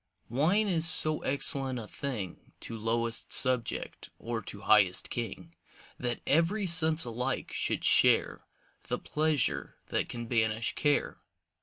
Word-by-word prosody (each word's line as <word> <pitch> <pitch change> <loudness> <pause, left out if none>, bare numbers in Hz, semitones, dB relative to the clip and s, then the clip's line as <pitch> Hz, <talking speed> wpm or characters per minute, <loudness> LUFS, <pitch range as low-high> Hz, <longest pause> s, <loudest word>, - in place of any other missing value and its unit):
Wine 175 - +1
is 165 -3 +3
so 155 -1 +6
excellent 135 -1 0
a 115 - -7
thing 110 -11 -7
To 115 - -7
lowest 115 +1 -3
subject, 130 -3 0
or 115 -1 -5
to 100 -1 -10
highest 100 -3 +2
king, 95 -8 -6 0.5
That 120 -1 -4
every 170 +8 +1
sense 160 -3 +3
alike 125 +3 -4
should - - -2
share - - +3 0.5
The - - -2
pleasure 155 -3 -1
that - - -2
can 120 -1 -6
banish 115 -1 -1
care. 145 -1 -1
125 Hz, 130 wpm, -29 LUFS, 115-155 Hz, 0.5 s, so